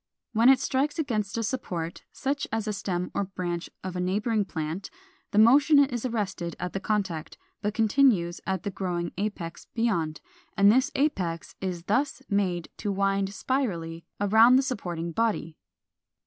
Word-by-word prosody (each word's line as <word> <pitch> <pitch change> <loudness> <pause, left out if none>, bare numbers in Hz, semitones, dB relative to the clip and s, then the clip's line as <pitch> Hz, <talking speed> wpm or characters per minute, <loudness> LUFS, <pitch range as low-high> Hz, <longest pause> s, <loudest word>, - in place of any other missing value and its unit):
When 230 +3 +5
it 270 - +6
strikes 280 +3 0
against 220 -9 -1
a 230 - 0
support, 180 -9 -3
such 275 +1 -2
as 220 0 -2
a 210 - 0
stem 180 -3 -3
or 200 - 0
branch 180 -2 -4
of 185 -1 -5
a - - -2
neighboring 205 +4 0
plant, 165 +1 -4 0.4
the - - -3
motion 275 +7 +7
is 260 -4 +3
arrested 200 -7 -3
at 180 - -4
the 195 - -2
contact, 190 -7 -2 0.2
but 210 0 -2
continues 215 -6 +3
at 190 -2 -1
the 200 - -2
growing 175 -3 -2
apex 195 -5 -4
beyond, 180 -10 0 0.4
and 200 +1 +7
this 260 +5 +3
apex 185 - -1
is 180 -3 -3
thus 265 +8 0
made 185 -4 0
to 205 - -2
wind 195 0 +1
spirally 175 -9 -2 0.2
around 220 +5 +6
the 265 - +5
supporting 175 - -3
body. 185 -5 -1
200 Hz, 160 wpm, -27 LUFS, 175-235 Hz, 0.4 s, motion